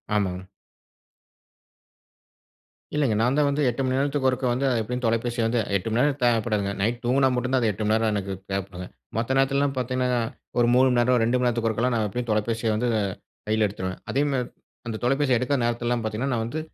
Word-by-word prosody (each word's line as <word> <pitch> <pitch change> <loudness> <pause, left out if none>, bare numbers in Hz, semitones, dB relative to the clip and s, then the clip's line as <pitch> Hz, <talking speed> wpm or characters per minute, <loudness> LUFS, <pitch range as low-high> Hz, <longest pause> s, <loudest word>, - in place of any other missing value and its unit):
ஆமாங்க. 95 -2 -2 2.5
இல்லைங்க, 140 -7 +2
நான் 125 +4 +2
தான் 150 -1 +3
வந்து 140 +1 0
8 120 +3 -3
மணி 130 0 0
நேரத்துக்கு 140 -1 +1
ஒருக்கா 130 0 -2
வந்து, 130 +3 0 0.2
எப்படியும் 125 +3 -4
தொலைபேசிய 115 +1 0
வந்து 120 +1 +1 0.2
8 100 +3 -1
மணி 115 - +1
நேரம் 145 0 +2
தேவைப்படாதுங்க. 110 -4 +1
நைட் 115 +5 0
தூங்கினா 130 +3 +3
மட்டும் 125 +1 -2
தான் 130 - +3
அது 115 - +2
8 105 +2 -5
மணிநேரம் 110 0 +2
எனக்கு 100 -1 -2 0.2
தேவைப்படுங்க. 95 -2 -4 0.3
மற்ற 120 +4 0
நேரத்துலலாம் 140 +1 +2
பார்த்தீங்கன்னா, 125 0 0 0.4
ஒரு 120 - +4
3 130 +1 +5
மணிநேரம், 125 +1 +3
2 120 +2 +1
மணி 125 0 +1
நேரத்துக்கு 115 -1 0
ஒருக்கலாம் 120 +3 0
நான் 110 -2 +1
எப்டியும் 120 +4 -4
தொலைபேசிய 110 +2 0
வந்து 120 +3 0 0.6
கையில 110 0 +2
எடுத்துருவேன். 95 -2 -5
அதேமாதிரி 135 -3 0 0.4
அந்த 115 -1 -3
தொலைபேசிய 135 0 +2
எடுக்காத 130 +3 0
நேரத்துலலாம் 120 0 -1
பார்த்தீங்கன்னா, 110 +5 -2
நான் 115 -2 0
வந்து 145 +7 -4
120 Hz, 180 wpm, -25 LUFS, 110-130 Hz, 2.5 s, 3